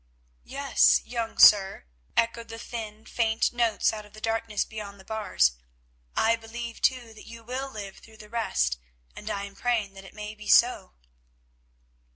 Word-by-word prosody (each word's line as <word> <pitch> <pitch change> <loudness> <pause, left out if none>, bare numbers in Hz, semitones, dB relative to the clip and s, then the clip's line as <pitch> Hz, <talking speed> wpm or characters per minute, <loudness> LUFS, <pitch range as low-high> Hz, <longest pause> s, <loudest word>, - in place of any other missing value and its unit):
"Yes, - - +4
young 235 -2 -4
sir," 195 - +6 0.3
echoed 230 0 +1
the 225 0 -8
thin, 220 -2 -7
faint 225 -1 0
notes 235 -2 +2
out 215 -1 -6
of 210 0 -18
the 215 - -11
darkness 225 -1 -1
beyond 205 -2 -8
the 190 - -15
bars, 210 - +2 0.6
"I 230 +1 +3
believe, 230 +1 -8
too, 245 -3 +1
that 220 - -14
you 230 0 -11
will 260 +4 -4
live 200 -5 -8
through 220 -1 -17
the 210 - -12
rest, 70 - 0 0.4
and - - -7
I 200 - -2
am 200 0 -8
praying 225 -3 -1
that 195 0 -11
it 190 - -14
may 210 0 -6
be 215 0 -12
so." 235 -6 +4
220 Hz, 170 wpm, -27 LUFS, 205-230 Hz, 0.6 s, sir